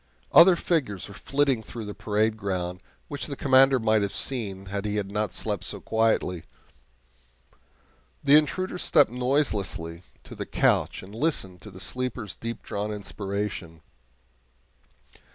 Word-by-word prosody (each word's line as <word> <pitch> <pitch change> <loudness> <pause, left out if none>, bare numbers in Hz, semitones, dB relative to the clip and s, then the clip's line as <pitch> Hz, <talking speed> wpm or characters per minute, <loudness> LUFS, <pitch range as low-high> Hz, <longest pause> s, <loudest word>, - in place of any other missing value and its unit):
Other 175 +2 +8
figures 135 - -1
were 100 - -11
flitting 135 +2 +1
through 110 0 -8
the 105 - -6
parade 110 +1 0
ground, 90 -3 -3 0.3
which 145 -1 -5
the 140 - -4
Commander 135 0 +5
might 110 -2 +2
have 100 -1 -2
seen 100 -7 -2
had 100 +1 -4
he 105 0 -1
not 100 0 -2
slept 105 -4 -2
so - - -2
quietly. 110 -6 +1 1.8
The 140 - +6
intruder 180 +5 +2
stepped - - +4
noiselessly 110 - -1 0.2
to - - -11
the - - -6
couch - - +1
and 95 +2 -12
listened 110 - -1
to 105 - -10
the 95 -2 -12
sleeper's 115 +1 -4
deep 115 0 -6
drawn 105 +1 -3
inspiration. 100 -5 -4
105 Hz, 135 wpm, -26 LUFS, 100-130 Hz, 1.8 s, Other